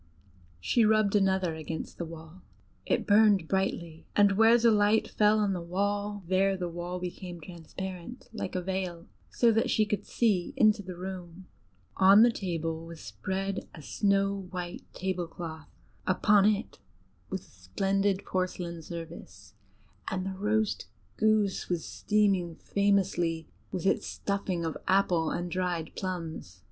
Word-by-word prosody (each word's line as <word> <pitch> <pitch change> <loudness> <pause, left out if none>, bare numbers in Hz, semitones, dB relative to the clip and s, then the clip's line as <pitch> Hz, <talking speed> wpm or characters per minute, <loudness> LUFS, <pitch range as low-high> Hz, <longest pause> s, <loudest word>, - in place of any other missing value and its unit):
She 230 - +2
rubbed 215 -1 +3
another 190 -4 +2
against 160 0 -6
the 170 - -2
wall: 165 +2 -11 0.5
it - - +1
burned 205 -4 +5
brightly, 170 -4 -2
and 205 -1 +5
where 225 +4 +6
the 235 -1 +4
light 210 +1 +3
fell 210 0 +3
on 205 -2 +1
the 180 - -3
wall, 205 +3 -2
there 190 +1 +2
the 180 -1 -2
wall 175 +1 -5
became 180 0 -6
transparent 180 +6 -8
like 190 - -4
a 180 - -1
veil, 185 -2 -3 0.2
so 235 -1 +3
that 225 +1 +1
she 215 - +3
could 210 0 -3
see 205 -7 +1
into 215 -2 +4
the 185 -2 -8
room. 185 -1 -7 0.5
On 195 +3 +8
the 240 - +5
table 165 -5 -3
was 165 -1 -9
spread 190 - -4
a 155 - -11
snow 195 +1 +1
white 180 0 -5
tablecloth; 175 -4 -4 0.4
upon 200 +2 +4
it 210 0 0 0.5
was 190 - -3
a - - -21
splendid 195 - -1
porcelain 180 -2 -3
service, 165 0 -9 0.6
and 185 -1 -2
the 195 - -3
roast 210 +2 0 0.3
goose 215 -3 +2
was 175 -3 -1
steaming 195 -5 +1
famously 185 -6 0 0.2
with 185 -2 -4
its - - +1
stuffing 195 -4 -2
of 160 - -3
apple 180 -4 +3
and 175 0 -3
dried 175 -3 -2
plums. 165 - -5
190 Hz, 145 wpm, -29 LUFS, 170-200 Hz, 0.6 s, On